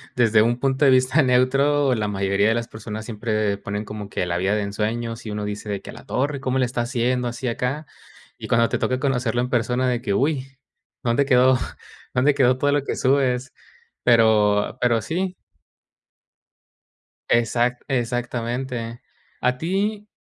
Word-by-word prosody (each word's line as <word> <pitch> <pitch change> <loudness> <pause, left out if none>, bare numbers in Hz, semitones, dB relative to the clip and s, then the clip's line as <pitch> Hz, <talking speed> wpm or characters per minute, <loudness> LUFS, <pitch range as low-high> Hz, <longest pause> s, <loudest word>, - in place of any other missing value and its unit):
desde 115 -3 +4
un 120 +2 +1
punto 135 +1 0
de - - +7
vista 130 +3 +4
neutro, 135 +2 +3
la 110 -3 -1
mayoría 100 0 +1
de 115 - +2
las 120 0 -2
personas 110 0 -7
siempre 110 -2 -1
ponen 105 +1 -4
como 105 -1 -7
que 90 - -2
la 85 0 -1
vida 95 +3 +1
de 105 - 0
ensueños 115 +3 -3
y - - -4
uno 105 0 -3
dice 105 +1 -5
de 100 -1 -2
que - - -10
a - - -12
la - - -13
torre, 140 +2 -1
¿cómo 130 -1 -1
le 130 - +3
está 120 0 -2
haciendo 125 +1 0
así 120 +2 -4
acá? 125 +6 -2 0.5
Y - - -7
cuando 115 0 +3
te - - -2
toca 130 0 0
conocerlo 125 -4 0
en 125 - -2
persona, 125 +1 +1
de 120 -1 0
que, 100 - -1
uy, 135 +1 -1 0.5
¿dónde 120 +4 +2
quedó 130 -1 +5 0.6
dónde 135 +4 +4
quedó 130 -2 +3
todo 145 +2 +1
lo 145 -1 +1
que - - -3
subes? 130 -1 +1 0.5
Pero 110 -3 +3
pero 120 -2 +3
sí. 185 - -2 1.9
Exac 120 +2 +1
exactamente. 120 -1 -3 0.4
A 125 0 +1
ti, 200 +7 -2
120 Hz, 170 wpm, -23 LUFS, 110-130 Hz, 1.9 s, de